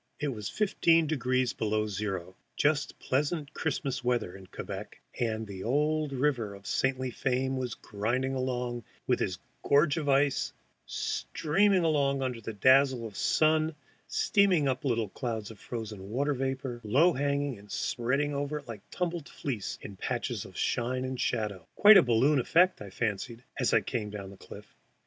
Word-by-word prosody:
It 150 0 -1
was 105 -6 -4
fifteen 165 -6 +3
degrees 130 -4 0
below 110 0 0
zero, 95 -3 -4 0.2
just 150 0 +1
pleasant 145 +3 -1
Christmas 135 -4 -2
weather 120 -7 0
in 95 -1 -12
Quebec, - - -7 0.2
and 110 -2 -1
the 95 -2 -7
old 150 +4 +1
river 125 -7 0
of 100 0 -15
saintly 130 +1 0
fame 130 +2 0
was 125 -3 -3
grinding 120 +6 -2
along 125 -2 -2 0.2
with 125 - +1
its 95 -2 -1 0.2
gorge 145 +2 +3
of 150 -3 -1
ice, 140 0 +2 0.3
streaming 190 +4 +1
along 140 -4 +2
under 125 -3 -2
a - - -2
dazzle 130 +3 +4
of 105 -3 -8
sun, 155 +4 +2 0.3
steaming 190 -8 +3
up 130 -1 -1
little 115 -4 +1
clouds 115 -2 -4
of 110 - -13
frozen 105 -5 -6
water 140 +6 0
vapor, 130 -2 -3
low 140 +12 +4
hanging 140 -2 -1
and 100 0 -15
spreading 135 +4 0
over 145 +1 -2
it 145 - -10
like 115 -3 -7
tumbled 175 -4 -3
fleece 120 -8 -4
in 100 -2 -8
patches - - -3
of - - -12
shine 125 +2 0
and 130 -1 -3
shadow, 105 -7 -2
quite 210 0 +9
a - - +9
balloon 130 +3 +3
effect, 175 +6 +3
I 100 - -7
fancied, 115 +3 -3 0.2
as 125 - +2
I - - +4
came 110 -5 -3
down 100 -2 -7
the 100 - -13
cliff. - - -12
130 Hz, 165 wpm, -29 LUFS, 110-145 Hz, 0.3 s, quite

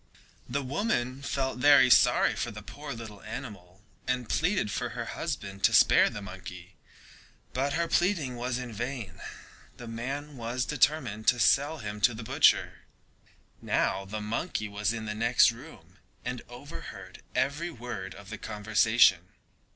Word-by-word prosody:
The 140 +3 -1
woman 135 - -1
felt 135 -2 -2
very 130 -2 +6
sorry - - +5
for - - -2
the - - -9
poor 145 0 -8
little 110 -5 -8
animal, 105 -5 -9 0.2
and 125 -2 -1
pleaded 165 - +1
for - - -2
her - - -3
husband 100 -1 -5
to - - +3
spare - - +6
the 105 - -7
monkey, 90 -1 -10 0.8
but 140 +2 0
her 170 +2 0
pleading 170 -10 +1
was 120 +1 -2
all 125 - -4
in 120 -2 -8
vain, 115 -5 -5 0.6
the 120 - -9
man 135 +5 -5
was 120 +2 -2
determined 130 -7 +1
to 125 - +4
sell 145 +7 +3
him 105 -5 -6
to 120 0 +4
the 115 - -7
butcher. - - +2 0.8
Now 95 - 0
the 105 +2 -5
monkey 110 +2 -2
was 105 0 -1
in 110 -1 -4
the 105 - -3
next 115 +3 +4
room 115 - -14 0.3
and - - -3
overheard - - -10
every 145 +6 0
word 115 - -7
of 100 -1 -12
the - - -6
conversation. 105 -3 +3
120 Hz, 155 wpm, -29 LUFS, 105-135 Hz, 0.8 s, very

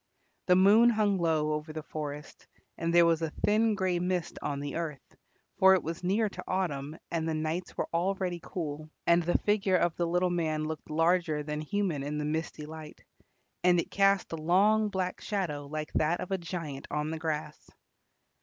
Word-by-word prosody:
The 180 - +6
moon 205 +6 +6
hung 210 -4 +2
low 160 -3 +1
over 150 +1 -4
the 155 0 -6
forest, 150 -1 -7 0.3
and 165 0 -2
there 170 0 +6
was 165 -1 +2
a 160 - -1
thin 215 +6 +2
grey 185 -3 0
mist 180 -2 -2
on 140 -1 -2
the 145 0 -5
earth, 160 -5 -5 0.4
for 190 0 +7
it 185 - -1
was 165 +2 -5
near 205 +5 +2
to 200 - -8
autumn 155 -5 -2
and 165 -1 -1
the 160 - -1
nights 155 +3 -3
were - - -1
already 180 0 0
cool; 155 -3 -5 0.2
and 170 0 +5
the 175 +1 +2
figure 200 -3 +2
of 175 -2 +1
the 170 - 0
little 180 +1 +1
man 160 -3 0
looked 155 0 -5
larger 165 -1 +1
than 150 0 -4
human 185 -3 -1
in 145 +2 -3
the 150 - -2
misty 155 0 -3
light, 155 0 -10 0.6
and 180 -1 +5
it - - -3
cast 195 -1 +3
a 165 - -3
long 205 +7 +3
black 185 -2 -3
shadow 155 -9 -3
like 155 +1 -5
that 160 +3 +1
of 185 - -6
a 190 - +1
giant 165 -5 -6
on 150 +1 -2
the 160 - -4
grass. 155 -2 -4
170 Hz, 190 wpm, -29 LUFS, 155-185 Hz, 0.6 s, for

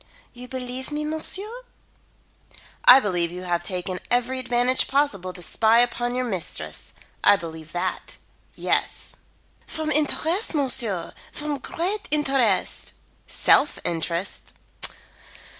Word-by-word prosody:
You 250 +1 -9
believe 255 0 -5
me, 300 0 -2
monsieur?" 390 +10 -3 1.2
"I 255 - +11
believe 175 -7 0
you 180 +1 -6
to - - -7
have 175 -1 +1
taken 180 +1 -3
every 250 +2 +1
advantage 250 0 +1
possible 265 -10 +1
to 180 -1 -7
spy 220 +6 +3
upon 245 0 0
your 255 0 0
mistress. 190 -8 -3 0.3
I - - +7
believe 160 -3 -8
that, 175 - -3 0.4
yes." - - -1 0.5
"From 315 -1 -3
interest, 315 +6 0
monsieur, 240 - 0 0.2
from 295 -1 -3
great 375 +10 -3
interest." 270 -8 +1 0.3
"Self 295 - +4
interest." 170 +2 -2
245 Hz, 115 wpm, -24 LUFS, 185-295 Hz, 1.2 s, I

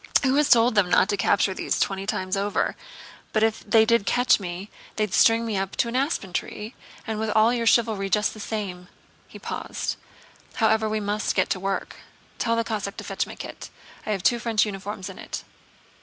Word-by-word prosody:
"Who 260 -1 +3
has 295 +1 +3
told 235 +1 +5
them 205 -4 +3
not 185 - +4
to - - +2
capture 200 0 +2
me 190 - -7
these - - -1
twenty 195 0 -1
times 185 -2 -1
over? 200 +1 0 0.6
But 215 - +2
if 220 -1 +2
they 220 +1 +4
did 225 -3 +2
catch 245 -1 +4
me 185 +1 -6 0.2
they'd 210 -3 -1
string 230 0 +4
me 220 -3 -2
up 195 0 -3
to - - +1
an 235 - -5
aspen 260 - -1
tree, 210 +6 -4 0.3
and 220 -2 -3
with 220 0 -1
all 220 +2 +4
your 235 -1 -1
chivalry 220 -4 +2
just 210 +1 +1
the 215 - -11
same." 195 -4 -5 0.4
He - - -12
paused. - - -4 0.6
"However, 220 -1 +2
we 215 0 -1
must 210 +1 -1
get - - +1
to 185 - 0
work. 195 +1 -3 0.4
Tell 230 -1 +1
the 230 - +1
Cossack 210 -3 -4
to - - -6
fetch - - -2
my - - -9
kit. - - -8 0.3
I - - -8
have 195 -3 -2
two 240 +4 +3
French 225 -2 +2
uniforms 200 -1 -5
in - - -9
it. - - -6
215 Hz, 210 wpm, -25 LUFS, 195-230 Hz, 0.6 s, told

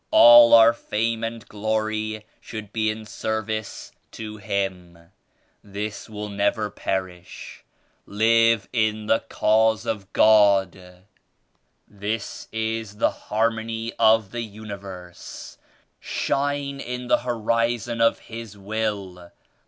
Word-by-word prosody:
All 120 0 +9
our 115 0 +7
fame 115 0 -2
and 115 +1 -5
glory 110 0 -2
should 110 -2 -9
be 110 -1 +1
in 110 0 -5
service 110 0 -4 0.2
to 110 -1 -7
Him. 95 -4 -3 0.7
This 105 +1 -6
will 105 -1 -6
never 100 +1 -1
perish. 95 -2 -5 0.4
Live 115 0 +3
in 110 -2 0
the 110 - +3
Cause 110 0 +1
of 100 -3 -4
God; 95 -4 +3 0.8
this 105 +2 -5
is 110 -1 -3
the - - +2
Harmony 115 +1 -2
of 110 -3 +4
the 120 - -4
Universe. 100 -5 -9 0.4
Shine 140 0 -2
in 125 -1 -5
the 125 - +3
Horizon 115 0 -1
of 115 - +3
His 115 -3 -9
Will. 100 -4 -4
110 Hz, 105 wpm, -23 LUFS, 100-115 Hz, 0.8 s, All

